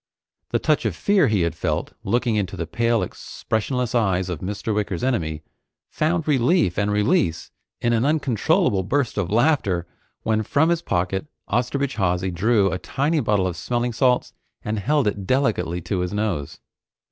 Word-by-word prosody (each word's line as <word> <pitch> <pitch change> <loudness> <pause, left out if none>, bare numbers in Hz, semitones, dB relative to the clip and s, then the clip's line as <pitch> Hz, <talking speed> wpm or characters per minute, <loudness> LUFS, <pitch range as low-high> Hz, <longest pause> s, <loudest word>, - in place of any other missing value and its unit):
The - - +1
touch - - +1
of - - 0
fear 200 -7 +3
he 105 -4 +2
had 85 -2 0
felt, 80 - -2
looking 120 +2 +1
into 95 -2 -2
the 85 - -2
pale 115 +7 +1
expressionless 125 +2 -3
eyes 95 -6 +1
of 90 -4 -3
Mr. 105 +3 -3
Wicker's 100 -4 -2
enemy, 80 -12 -1 0.5
found 160 +1 0
relief 130 - +2
and 100 0 +1
release 105 - +1 0.3
in 120 - +2
an 115 0 +2
uncontrollable 130 -9 +2
burst 120 +3 -1
of 90 -4 -1
laughter 110 - +2 0.4
when 110 -1 +1
from 145 +9 +2
his 170 -1 +1
pocket 95 - -1 0.2
Osterbridge 130 +4 -1
Hawsey 95 -1 0
drew 100 +2 +2
a 90 - -2
tiny 145 - 0
bottle 105 -7 +1
of 90 -2 -2
smelling 120 +6 -2
salts 125 +1 +2 0.3
and 105 0 -2
held 145 +5 +1
it 100 -2 -2
delicately 130 -10 +1
to 95 +2 -2
his 90 0 -2
nose. 105 -9 -2
110 Hz, 165 wpm, -23 LUFS, 95-130 Hz, 0.5 s, fear